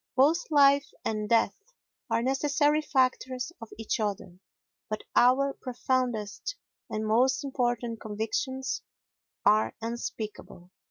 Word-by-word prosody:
Both 300 +7 +3
life 280 -1 +5 0.2
and 215 -1 -2
death 230 -3 +3 0.6
are 230 - +1
necessary 290 +3 +2
factors 260 -1 0
of 230 - -9
each 225 +1 -2
other. 195 -4 -3 0.5
But 215 0 -3
our 270 +3 +4
profoundest 250 - -2 0.3
and 215 0 -2
most 255 +5 +3
important 240 -4 -1
convictions 225 +5 -2 0.6
are 215 +1 +4
unspeakable. 220 -5 -6
245 Hz, 105 wpm, -28 LUFS, 220-270 Hz, 0.6 s, life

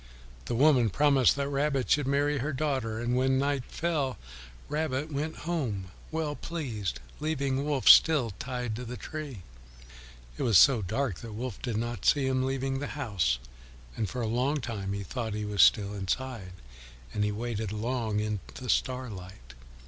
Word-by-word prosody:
The - - -2
woman 130 -3 +5
promised 140 +1 +4
that 140 0 -1
Rabbit 140 -2 0
should 145 -3 +3
marry 145 +1 +1
her 145 +4 -2
daughter, 130 -6 -1
and 120 +1 0
when 130 +1 +2
night 140 -1 0
fell 155 -6 -1 0.5
Rabbit 150 0 -2
went 150 +3 -2
home 115 - -2 0.2
well 160 -2 -2
pleased, 125 - -4 0.2
leaving 140 -3 -1
Wolf 145 -3 -1
still 145 -9 +7
tied 125 -4 -3
to 125 - -5
the 125 +1 -6
tree. 140 - -7 0.9
It - - -5
was 110 -6 +5
so 130 0 +7
dark 110 +1 -2
that 115 -2 -8
Wolf 120 +3 -5
did 120 -4 -2
not 120 0 -3
see 145 -2 +4
him 130 0 +1
leaving 135 0 -1
the 145 - -3
house, 100 - +1 0.6
and 110 -4 -2
for 125 - -4
a 115 - -1
long 130 +6 +1
time 100 -6 -4
he 100 0 -3
thought 110 +1 -4
he 105 0 -3
was 105 -1 +2
still 105 -1 +5
inside, 100 0 -3 0.6
and 105 - 0
he 105 - +1
waited 110 -1 -3
long 110 -1 -1
in 105 -1 -2 0.2
the 125 -1 -7
starlight. 95 - -3
125 Hz, 170 wpm, -29 LUFS, 110-140 Hz, 0.9 s, still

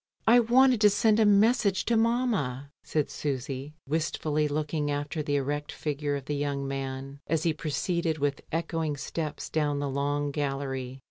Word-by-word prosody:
"I 240 +2 +7
wanted 245 0 +4
to 210 - +7
send 215 +1 +3
a 220 - +5
message 205 -1 +3
to 235 - +2
mamma/' 220 - 0
said 150 -2 -1
Susy, 135 +1 -4
wistfully 155 0 0
looking 150 0 -1
after 145 +2 -2
the 145 -1 -1
erect 145 +1 -2
figure 145 -1 -2
of 140 -2 -5
the 145 - -2
young 140 -1 -2
man 135 0 -5
as 160 0 0
he 165 - +2
proceeded 160 +1 -1
with 145 -1 -1
echoing 165 -2 -1
steps 155 +2 -4
down 150 -2 0
the 145 0 -1
long 145 +1 -1
gallery. 135 -2 -3
150 Hz, 160 wpm, -28 LUFS, 140-170 Hz, -, I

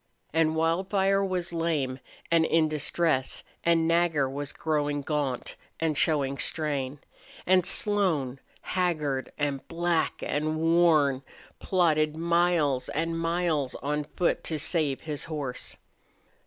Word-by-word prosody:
And 160 0 +2
Wildfire 190 +4 +1
was 180 -3 -2
lame 155 -6 -1 0.3
and 165 -1 +5
in 160 0 +3
distress 155 -2 -1 0.2
and 165 -1 +3
Nagger 165 -4 +2
was 140 +1 -4
growing 145 -2 -1
gaunt 140 -4 -2 0.2
and 160 -2 0
showing 140 -3 +1
strain; 145 -3 -1 0.5
and 185 -1 +4
Slone, 165 -11 +1 0.2
haggard 155 -7 -1
and 145 -2 -2
black 170 0 -1
and 155 +2 -1
worn, 160 -5 +3 0.4
plodded 155 -4 +1
miles 170 -5 +1
and 165 +2 -1
miles 165 -5 0
on 150 +2 -2
foot 170 +4 -1
to 160 - -1
save 150 -3 0
his 150 -2 -4
horse. 145 -6 -5
155 Hz, 115 wpm, -27 LUFS, 145-170 Hz, 0.5 s, and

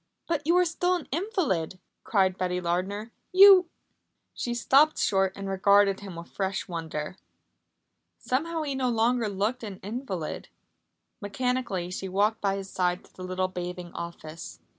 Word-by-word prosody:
"But 310 -3 -2
you 340 +2 +4
are 360 - +5
still 355 +2 +1
an 345 - -5
invalid," 295 - -1 0.3
cried 190 -3 +2
Betty 180 -1 -1
Lardner. 190 +6 -2 0.2
"You 380 -2 +8 0.3
" - - -52
She 240 -1 -3
stopped 280 +6 +4
short 195 -1 +2
and 195 0 -6
regarded 195 +1 +4
him 195 -3 -9
with 170 0 -9
fresh 195 -1 -2
wonder. 160 -1 -5 1.0
Somehow 320 +5 -1
he 285 -2 -2
no 260 -1 0
longer 230 0 +1
looked 210 +6 -1
an 200 -4 -7
invalid. 200 - -5 0.7
Mechanically 205 -4 -2
she 190 +1 -4
walked 210 +4 +1
by 195 -1 +1
his 195 -1 -5
side 180 -1 0
to - - -24
the 185 - -9
little 185 0 -1
bathing 180 -1 -6
office. 165 -1 -8
200 Hz, 155 wpm, -27 LUFS, 185-255 Hz, 1.0 s, You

